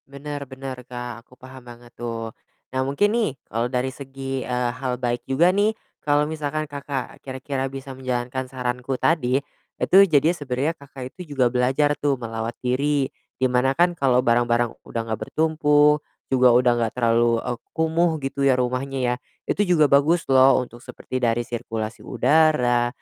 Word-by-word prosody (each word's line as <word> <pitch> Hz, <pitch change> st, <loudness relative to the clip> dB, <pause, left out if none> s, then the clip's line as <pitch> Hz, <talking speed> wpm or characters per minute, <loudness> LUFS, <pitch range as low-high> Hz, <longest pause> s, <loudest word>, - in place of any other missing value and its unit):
Bener 140 Hz, 0 st, -7 dB
bener, 130 Hz, -1 st, -7 dB
Kak, 120 Hz, -2 st, -6 dB
aku -, -, -22 dB
paham 130 Hz, +1 st, -12 dB
banget 120 Hz, 0 st, -14 dB
tuh. 115 Hz, -2 st, -5 dB, 0.4 s
Nah, 130 Hz, -, 0 dB
mungkin 205 Hz, +10 st, +2 dB
nih 230 Hz, -8 st, +1 dB
kalau 115 Hz, +2 st, -1 dB
dari 125 Hz, +1 st, -1 dB
segi, 135 Hz, -1 st, -5 dB
eee, 125 Hz, -1 st, -1 dB
hal 130 Hz, 0 st, -3 dB
baik 120 Hz, -1 st, -2 dB
juga 165 Hz, +7 st, +4 dB
nih, 210 Hz, +2 st, +2 dB, 0.3 s
kalau 145 Hz, 0 st, +2 dB
misalkan 155 Hz, 0 st, -3 dB
Kakak 140 Hz, -2 st, -6 dB
kira-kira 135 Hz, 0 st, -4 dB
bisa 135 Hz, 0 st, -8 dB
menjalankan 130 Hz, 0 st, -3 dB
saranku 125 Hz, 0 st, -3 dB
tadi, 130 Hz, -6 st, +2 dB, 0.4 s
itu 190 Hz, -, +3 dB
jadinya 155 Hz, +2 st, +4 dB
sebenarnya 140 Hz, 0 st, -2 dB
Kakak 140 Hz, -2 st, -10 dB
itu 170 Hz, -6 st, -9 dB
juga 125 Hz, -3 st, +3 dB
belajar 135 Hz, +4 st, +2 dB
tuh 145 Hz, -2 st, +1 dB
melawat 115 Hz, -1 st, -5 dB
diri. 140 Hz, +3 st, +1 dB, 0.3 s
Di 130 Hz, -, +1 dB
mana 125 Hz, +2 st, +2 dB
kan 175 Hz, +1 st, +4 dB
kalau 130 Hz, -4 st, +3 dB
barang-barang 120 Hz, 0 st, +2 dB
udah 115 Hz, -, -3 dB
nggak 110 Hz, -1 st, -3 dB
bertumpuk, 150 Hz, -1 st, +3 dB, 0.3 s
juga 130 Hz, -1 st, +5 dB
udah 125 Hz, 0 st, +5 dB
nggak 115 Hz, -1 st, -1 dB
terlalu, 115 Hz, -1 st, +3 dB
eee, 120 Hz, -, -3 dB, 0.2 s
kumuh 160 Hz, +2 st, +2 dB
gitu 135 Hz, +1 st, -3 dB
ya 130 Hz, -, +5 dB
rumahnya 125 Hz, +2 st, -1 dB
ya, -, -, -2 dB, 0.3 s
itu -, -, 0 dB
juga 170 Hz, -4 st, +5 dB
bagus 155 Hz, +5 st, +4 dB
loh 130 Hz, 0 st, +6 dB
untuk 120 Hz, -1 st, -12 dB
seperti 130 Hz, +1 st, -6 dB
dari 120 Hz, 0 st, +1 dB
sirkulasi 115 Hz, -2 st, -5 dB
udara, 125 Hz, -2 st, +3 dB
130 Hz, 165 wpm, -23 LUFS, 125-145 Hz, 0.4 s, loh